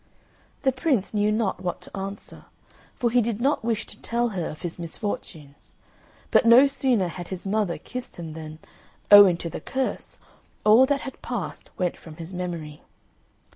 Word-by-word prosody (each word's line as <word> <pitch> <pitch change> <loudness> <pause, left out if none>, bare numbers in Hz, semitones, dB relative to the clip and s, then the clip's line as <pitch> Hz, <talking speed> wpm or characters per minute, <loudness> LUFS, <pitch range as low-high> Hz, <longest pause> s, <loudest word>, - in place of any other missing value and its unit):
The 265 - +4
Prince 260 - 0
knew 210 0 +2
not 215 -2 0
what 180 -1 -3
to - - -11
answer, 195 +1 -7 0.5
for 240 -2 0
he 245 +1 +4
did 225 -1 -2
not 275 +2 +1
wish 225 -2 -1
to - - -14
tell 235 +1 0
her 185 -6 -3
of 155 - -10
his 175 0 -5
misfortunes; 160 -5 -6 0.6
but - - +5
no 235 +4 +8
sooner 260 -8 +1
had 175 0 -7
his 185 0 -7
mother 200 -3 0
kissed 250 0 -8
him 165 -3 -7
than, 155 -1 -8 0.5
owing 200 -4 +9
to 170 - -5
the 160 - -6
curse, 265 +7 -3 0.5
all 225 +5 +7
that 285 -1 +1
had 265 - -8
passed 240 -6 -5
went 180 -2 -1
from 160 -2 -12
his 165 +2 -9
memory. 170 -5 -5
205 Hz, 175 wpm, -25 LUFS, 175-240 Hz, 0.6 s, owing